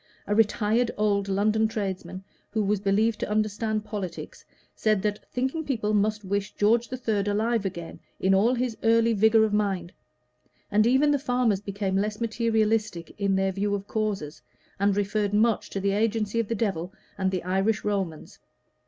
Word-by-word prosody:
A 205 - -1
retired 225 +2 +2
old 200 -1 +1
London 215 +3 +2
tradesman, 195 -3 -4 0.3
who 215 0 -1
was 205 0 +1
believed 210 +3 +1
to - - -3
understand 215 0 -1
politics, 205 -5 -6 0.3
said 215 -3 +1
that 210 -1 -3
thinking 265 +6 -1
people 220 -7 -1
must 210 +1 +1
wish 200 +1 -2
George 225 +3 +2
III 255 - -3
were 210 -3 +2
alive 215 +1 +1
again 170 -3 -7 0.2
in 190 +1 +3
all 220 +6 +3
his 245 -2 -1
early 230 0 +3
vigor 220 +1 +4
of 215 -1 0
mind: 195 -4 -1 0.8
and 215 +2 +4
even 270 +4 +4
the 285 - +2
farmers 245 -7 +1
became 200 -1 -3
less 210 +2 -1
materialistic 220 -5 0
in 200 -1 +1
their 190 0 +1
view 200 +2 -1
of 200 -1 -5
causes, 205 -9 -3 0.4
and 200 0 +2
referred 205 0 0
much 220 0 +2
to 195 - -3
the 200 +1 0
agency 220 +1 0
of 230 - 0
the 230 - -1
devil 190 -5 -2 0.2
and 190 -1 0
the 185 -2 -3
Irish 195 +4 0
Romans. 195 -7 -3
210 Hz, 170 wpm, -26 LUFS, 195-225 Hz, 0.8 s, vigor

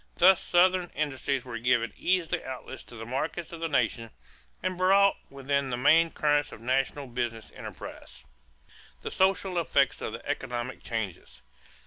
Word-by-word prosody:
Thus 185 +1 +6
Southern 180 0 +3
industries 135 -3 -1
were 115 -2 -5
given 120 -1 +1
easy 180 -2 0
outlets 130 -1 -7
to 120 - -13
the 115 0 -7
markets 155 +7 -3
of 170 - -7
the 165 - -1
nation 115 -4 0 0.5
and 185 0 -1
brought 195 +2 +5
within 140 0 -1
the 120 - -2
main 165 +6 +5
currents 145 -2 +1
of - - -10
national 135 +4 0
business 120 -3 -4
enterprise. 65 - -9 0.8
=The - - -4
Social 190 -1 +2
Effects 140 -5 +2
of 110 - -4
the 115 - -8
Economic 130 -3 -3
Changes. 110 -7 -5
140 Hz, 150 wpm, -28 LUFS, 120-170 Hz, 0.8 s, Thus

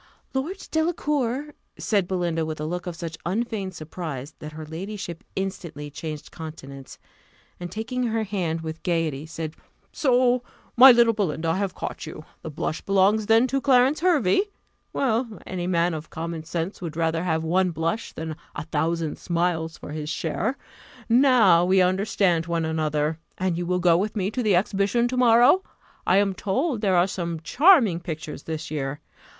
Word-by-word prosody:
"Lord 315 +9 -3
Delacour!" 295 -4 0 0.2
said 200 -5 +1
Belinda, 175 -3 -1
with 155 -1 -4
a 150 - -3
look 175 +3 -4
of 175 - -4
such 165 -1 -6
unfeigned 200 -1 -2
surprise, 155 -4 -6
that 150 0 -8
her 155 0 -7
ladyship 175 +2 -6
instantly 170 -6 -5
changed 155 0 -7
countenance, 140 -4 -9 0.6
and, 175 -1 -6
taking 245 +5 -2
her 225 0 0
hand 180 -6 -2
with 160 0 -6
gaiety, 160 -4 -1
said, 160 -1 -5 0.4
"So, 250 -2 +3 0.3
my 260 +2 +10
little 235 -1 +5
Belinda, 165 -6 -1
I 165 - +1
have 195 -2 -2
caught - - -5
you 155 0 -9 0.2
the - - -6
blush 155 +1 -3
belongs 200 +2 +2
then 225 +2 +5
to 270 +1 -1
Clarence 265 +2 +4
Hervey? 320 - +3 0.5
Well, 235 -3 -1
any 180 -1 -4
man 170 -1 +2
of 155 0 -6
common 165 0 -5
sense 170 +4 -4
would 165 -3 -5
rather 165 0 0
have 160 -3 0
one 180 +3 +2
blush 165 +6 -2
than 160 -1 -5 0.2
a - - -4
thousand 160 0 -1
smiles 170 -2 -1
for - - -9
his 150 0 -4
share: 185 - -2 0.5
now 240 -8 +6
we 190 +2 +4
understand 185 -2 +2
one 170 -1 0
another. 155 0 -1 0.2
And 185 -2 0
will 175 +1 -1
you - - -1
go 175 -1 +4
with 205 +5 -2
me 200 -1 -1
to 250 - -2
the 210 -5 +3
exhibition 200 +5 +1
to 255 - -3
morrow? 245 +8 +6 0.5
I 185 - +5
am 200 -1 +3
told 235 - -1
there 190 -4 +3
are 175 - +5
some 170 -3 -3
charming 250 - +5
pictures 160 -4 -6
this 160 -1 -5
year. 145 -2 -3
180 Hz, 170 wpm, -25 LUFS, 160-220 Hz, 0.6 s, my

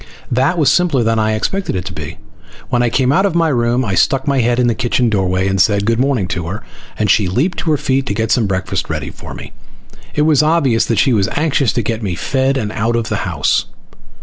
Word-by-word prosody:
That 130 +8 +1
was 145 -5 +3
simpler 160 -7 +2
than 115 0 +1
I 110 0 +1
expected 190 - -2
it 90 -1 -3
to 95 - -6
be. 75 -2 -7 0.5
When 120 -1 +1
I 120 - +2
came 130 +2 +1
out 190 +7 +3
of 180 - -4
my 165 -1 +2
room 120 -1 +1
I 100 - -2
stuck 135 +7 +1
my 140 -2 +2
head 120 0 +1
in 125 - +3
the 120 - +2
kitchen 120 0 0
doorway 95 -2 0
and 95 -1 +1
said 100 +1 +2
good 115 +1 +1
morning 130 -8 +1
to 85 -1 -3
her, 100 +5 -5 0.3
and 105 - 0
she 100 +1 +3
leaped 135 - -1
to - - -2
her 150 - +3
feet 135 0 -1
to 100 - -2
get 110 +1 -1
some 115 -4 +2
breakfast 95 0 -2
ready 75 -2 -4
for - - -10
me. - - -10 0.6
It 150 - +2
was 155 -2 +4
obvious 150 -7 +2
that 115 - -1
she 125 +5 +3
was 100 -4 +1
anxious 145 -6 +1
to 120 - -1
get 115 +1 -3
me 95 -5 -3
fed 135 +7 0
and 105 -5 -3
out 115 +2 -1
of 115 -1 -2
the - - -1
house. - - +1
120 Hz, 250 wpm, -16 LUFS, 100-135 Hz, 0.6 s, was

